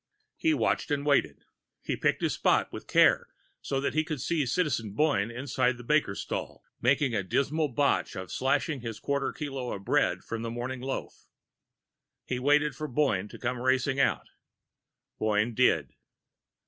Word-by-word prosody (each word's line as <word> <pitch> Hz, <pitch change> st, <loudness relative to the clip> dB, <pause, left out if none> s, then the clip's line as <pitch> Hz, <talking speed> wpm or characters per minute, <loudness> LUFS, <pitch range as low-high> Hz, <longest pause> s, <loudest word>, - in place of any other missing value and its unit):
He 320 Hz, -1 st, +2 dB
watched -, -, 0 dB
and 145 Hz, -1 st, -1 dB
waited. 145 Hz, -2 st, +1 dB, 0.4 s
He -, -, -1 dB
picked -, -, 0 dB
his -, -, +1 dB
spot -, -, +2 dB
with -, -, -8 dB
care, -, -, +4 dB, 0.3 s
so 135 Hz, -, -2 dB
that 140 Hz, -, -1 dB
he 155 Hz, +1 st, +2 dB
could 155 Hz, -3 st, -4 dB
see 150 Hz, +1 st, 0 dB
Citizen 130 Hz, -, 0 dB
Boyne 110 Hz, -5 st, +2 dB
inside 125 Hz, 0 st, 0 dB
the 120 Hz, -, -10 dB
baker's 145 Hz, -7 st, +1 dB
stall, -, -, -5 dB, 0.2 s
making 135 Hz, 0 st, +2 dB
a 110 Hz, -, +1 dB
dismal 145 Hz, -, 0 dB
botch 140 Hz, -3 st, 0 dB
of 95 Hz, -1 st, -6 dB
slashing 135 Hz, +1 st, 0 dB
his 115 Hz, -2 st, -6 dB
quarter 140 Hz, +3 st, -1 dB
kilo 135 Hz, -4 st, -5 dB
of 100 Hz, 0 st, -8 dB
bread -, -, +1 dB
from 115 Hz, -1 st, -5 dB
the 115 Hz, -, -3 dB
Morning 120 Hz, +2 st, -4 dB
Loaf. 135 Hz, +1 st, -6 dB, 1.0 s
He 125 Hz, -, -2 dB
waited 145 Hz, +2 st, +3 dB
for 155 Hz, -, -4 dB
Boyne 120 Hz, -9 st, +1 dB
to -, -, -11 dB
come 125 Hz, 0 st, -2 dB
racing 130 Hz, +1 st, +1 dB
out.... -, -, +1 dB, 0.9 s
Boyne 110 Hz, +2 st, +1 dB
did. 125 Hz, +3 st, +2 dB
130 Hz, 165 wpm, -28 LUFS, 115-145 Hz, 1.0 s, care